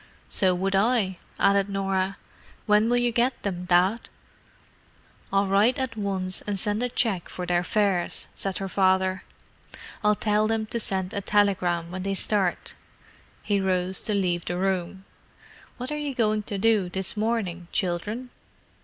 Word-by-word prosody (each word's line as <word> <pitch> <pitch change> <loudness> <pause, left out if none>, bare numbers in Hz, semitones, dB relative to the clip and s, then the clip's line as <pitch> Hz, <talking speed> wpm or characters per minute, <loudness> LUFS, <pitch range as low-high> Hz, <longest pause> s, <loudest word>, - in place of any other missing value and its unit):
"So 185 -3 +5
would 195 +2 -1
I," 200 -3 +2 0.2
added 200 0 +3
Norah. 195 -1 -1 0.5
"When 210 +2 +4
will 245 - +3
you 245 0 +2
get 245 +2 +1
them, 180 -3 -3
Dad?" 185 +5 +2 1.2
"I'll 195 0 +3
write 205 +7 +3
at 260 -3 -3
once 190 -3 -2
and 205 -2 -3
send 210 +2 +1
a 250 - 0
cheque 220 -7 -1
for 180 - -5
their 175 0 +1
fares," 195 -3 0
said 195 -1 -2
her 195 - -3
father. 190 0 +2 0.8
"I'll 210 0 +4
tell 210 0 +1
them 220 0 0
to 235 +2 -3
send 190 -3 -2
me - - -2
a - - -6
telegram 185 -5 +1
when 185 0 -5
they 195 +1 -2
start." 195 -2 0 0.7
He 200 -2 +1
rose 185 0 0
to 210 - -1
leave 175 -3 0
the 175 - -2
room. 190 0 -2 0.7
"What 250 +3 -5
are 300 - -2
you 290 -3 -3
going 215 -2 +1
to 205 - -2
do 210 -3 +2
this 190 0 -2
morning, 210 -6 -2
children?" 210 +8 -2
195 Hz, 160 wpm, -26 LUFS, 185-215 Hz, 1.2 s, So